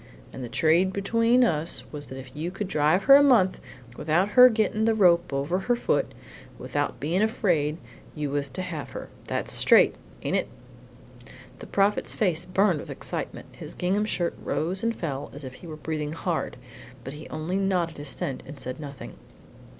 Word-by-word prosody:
And 130 - -7
the 120 - -6
trade 170 +8 +3
between 230 +5 +3
us 165 -7 0
was 145 -1 -7
that 130 - -8
if 130 0 -11
you 160 +3 -3
could 195 +2 -4
drive 155 +2 +2
her 275 - +8
a 285 - +8
month, 235 -10 +4 0.4
without 165 +6 +1
her 250 +3 +8
getting 220 -1 0
the 225 -1 +3
rope 175 -5 +4
over 140 +7 -1
her 245 +5 +1
foot 240 - +1
and - - -18
without - - -2
bein' 170 +6 0
afraid, 175 -9 +1 0.4
you 150 -2 -3
was 140 -1 0
to 135 +8 -5
have 160 -5 -5
her. - - -8 0.2
That's - - -2
straight, - - +5 0.3
ain't - - +1
it?" - - -1 1.1
The - - -9
Prophet's 200 +1 +1
face 180 -5 0
burned 185 -3 +2
with - - -9
excitement, - - -5
his - - -10
gingham 195 +4 0
shirt 175 -5 -1
rose 180 +5 -1
and 230 0 0
fell 140 -5 -4
as 145 - -7
if 130 -1 -7
he 170 - -12
were 155 - -7
breathing 155 -1 -3
hard, 165 -3 -3 0.5
but 135 - -7
he 150 +1 -10
only 160 +4 -3
nodded 180 -5 0
assent 140 -2 -4
and 145 -3 -9
said 130 +2 -6
nothing. 140 -2 -9
170 Hz, 185 wpm, -26 LUFS, 150-200 Hz, 1.1 s, her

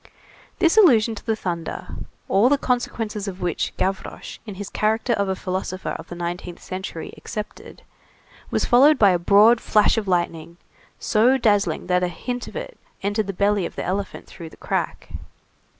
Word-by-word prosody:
This 340 +3 +3
allusion 235 - +6
to 220 - -9
the 225 -2 0
thunder, 170 -5 -5 0.4
all 205 +6 +4
the 285 - +4
consequences 225 -5 -2
of 190 -1 -5
which 175 -3 -1
Gavroche, 190 0 -3
in 205 - -6
his 200 +1 -6
character 220 +4 0
of 200 -3 0
a 190 - 0
philosopher 185 0 -4
of - - -7
the 175 - -8
nineteenth 175 0 -5
century, 185 -3 -6
accepted, 210 -1 -8 0.7
was - - 0
followed 275 +5 +6
by 200 -5 +6
a 175 - +1
broad 210 +6 +5
flash 210 +1 +3
of 210 - -7
lightning, 170 -2 -1 0.4
so 240 +5 +3
dazzling 205 -9 +1
that 180 0 +2
a 180 - +1
hint 245 +8 -5
of - - -11
it - - -7 0.2
entered 205 +1 0
the - - -1
belly 200 +1 +1
of - - -14
the - - -4
elephant 195 +1 -3
through 165 -1 -10
the - - -17
crack. - - -3
200 Hz, 175 wpm, -23 LUFS, 180-225 Hz, 0.7 s, allusion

